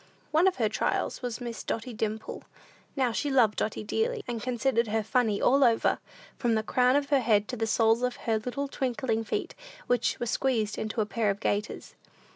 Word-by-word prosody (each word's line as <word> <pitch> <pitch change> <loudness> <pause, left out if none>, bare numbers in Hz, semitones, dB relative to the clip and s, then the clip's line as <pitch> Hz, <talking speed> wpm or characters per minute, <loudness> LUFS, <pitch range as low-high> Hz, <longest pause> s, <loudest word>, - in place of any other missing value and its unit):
One 320 +4 +4
of 375 - +2
her 225 -4 +1
trials 210 - -1
was 245 -2 -4
Miss 235 -2 -6
Dotty 230 +2 -4
Dimple. 220 0 -4 0.5
Now, 260 -4 +1
she 290 +6 -1
loved 245 -6 +3
Dotty 215 - -2
dearly, 445 - -1
and 235 -2 -3
considered 240 -1 0
her 220 +1 0
funny 220 -2 +1
all 275 +2 +4
over, 230 -3 +3 0.4
from 240 -4 +2
the 220 - 0
crown 250 +3 +3
of 285 -1 +1
her 280 - +5
head 215 -4 +2
to 255 - -3
the 225 -1 -1
soles 225 +1 +3
of 250 0 0
her 225 -1 -1
little 255 +5 -3
twinkling 250 -4 -1
feet, 220 - -3 0.3
which 245 -1 +1
were 240 - -1
squeezed 225 -3 0
into 220 +1 -2
a - - +1
pair 215 0 0
of 200 0 -1
gaiters. 210 +1 -2
235 Hz, 200 wpm, -28 LUFS, 220-255 Hz, 0.5 s, her